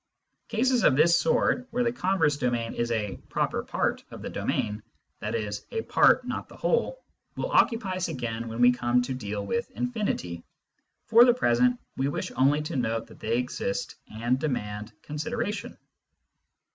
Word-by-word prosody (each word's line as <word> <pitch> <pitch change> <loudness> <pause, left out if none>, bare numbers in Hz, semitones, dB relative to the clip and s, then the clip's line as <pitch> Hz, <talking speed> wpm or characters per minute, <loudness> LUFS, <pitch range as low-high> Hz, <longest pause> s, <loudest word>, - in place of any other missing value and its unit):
Cases 245 +1 +2
of 135 - +5
this 165 +4 +5
sort, 235 +10 +2
where 245 +2 0
the 235 - +1
converse 185 -9 +2
domain 120 -4 -1
is 120 0 -1
a 105 -3 -1
" - - -27
proper - - 0
part - - -1
" - - -39
of - - -10
the - - -5
domain 105 +1 -2 0.4
(i.e. 105 -1 -2 0.2
a 450 - 0
part - - +4
not - - -4
the - - -13
whole), - - 0 0.3
will - - -3
occupy 225 - +3
us 185 - -1
again 120 -7 -4
when 115 +1 -4
we 125 0 +8
come 125 0 +1
to 130 - -3
deal 105 -5 -4
with 235 - -2
infinity. 205 - -3 0.6
For 230 +2 +7
the 245 -1 +5
present, 125 - +3 0.2
we 135 - +1
wish 140 - -3
only 145 +3 +3
to 150 - -5
note 115 -3 -1
that - - -16
they 115 +2 0
exist 125 -5 -2 0.2
and 120 +4 0
demand 105 -7 -3
consideration. 205 +7 -4
130 Hz, 170 wpm, -27 LUFS, -, 0.6 s, we